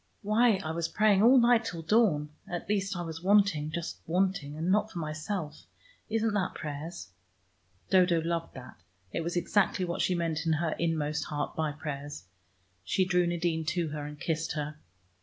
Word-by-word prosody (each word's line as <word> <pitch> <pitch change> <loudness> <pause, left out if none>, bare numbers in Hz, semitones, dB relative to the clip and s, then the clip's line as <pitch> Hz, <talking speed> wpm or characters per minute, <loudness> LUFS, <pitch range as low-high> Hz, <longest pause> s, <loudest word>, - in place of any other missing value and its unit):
"Why 220 +2 +4
I 160 - -1
was 165 0 -1
praying 205 +3 +3
all 245 +4 +7
night 240 -1 +5
till 170 -7 -5
dawn. 165 -6 +3 0.2
At 175 -1 -4
least, 195 -2 0
I 175 - -3
was 165 -1 -6
wanting, 190 -6 +3
just 170 +1 -4
wanting, 175 -4 0
and 165 +4 0
not 210 +2 +2
for - - -8
myself. 155 0 -4 0.4
Isn't 225 0 +1
that 195 -3 -1
prayers?" 150 - -6 0.8
Dodo 180 -3 +5
loved 165 0 -3
that: 130 -1 -11 0.3
it - - -2
was 170 +2 -3
exactly 185 +1 +1
what 170 -1 -2
she 180 - +2
meant 165 -1 -1
in 160 - +3
her 155 +1 0
inmost 155 -3 0
heart 145 -1 -3
by 155 -1 0
prayers. 145 -1 -6 0.6
She 185 - +1
drew 180 -1 +2
Nadine 170 -1 0
to 165 0 -1
her 150 -1 -5
and 150 0 -9
kissed 160 0 -2
her. 150 0 -4
170 Hz, 175 wpm, -29 LUFS, 155-190 Hz, 0.8 s, all